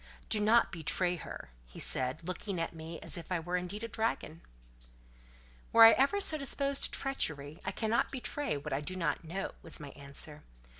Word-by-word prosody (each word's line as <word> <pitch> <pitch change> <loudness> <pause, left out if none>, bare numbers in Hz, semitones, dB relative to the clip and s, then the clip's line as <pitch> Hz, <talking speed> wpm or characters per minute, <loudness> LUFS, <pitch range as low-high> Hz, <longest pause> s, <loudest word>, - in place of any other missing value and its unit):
"Do 215 - +2
not 220 +3 +4
betray 175 +2 +1
her," 105 - -8 0.2
he - - -14
said, 130 +5 -1
looking 185 0 -3
at 165 - -2
me 165 +1 -7
as - - -5
if 170 - -12
I 180 - +1
were 175 +2 -3
indeed 180 +4 -3
a - - -2
dragon. 220 -8 -2 1.3
"Were 230 - +9
I 225 - +11
ever 280 - +3
so 315 -6 +3
disposed 275 0 +2
to - - -2
treachery, 155 - -2
I - - -2
cannot 225 +1 +1
betray 265 - -2
what 145 +1 -5
I 135 - 0
do 185 +5 -5
not 170 -2 -1
know," 185 +4 -4
was 165 - -7
my 145 -2 -7
answer. 140 +2 -5
180 Hz, 190 wpm, -32 LUFS, 155-230 Hz, 1.3 s, I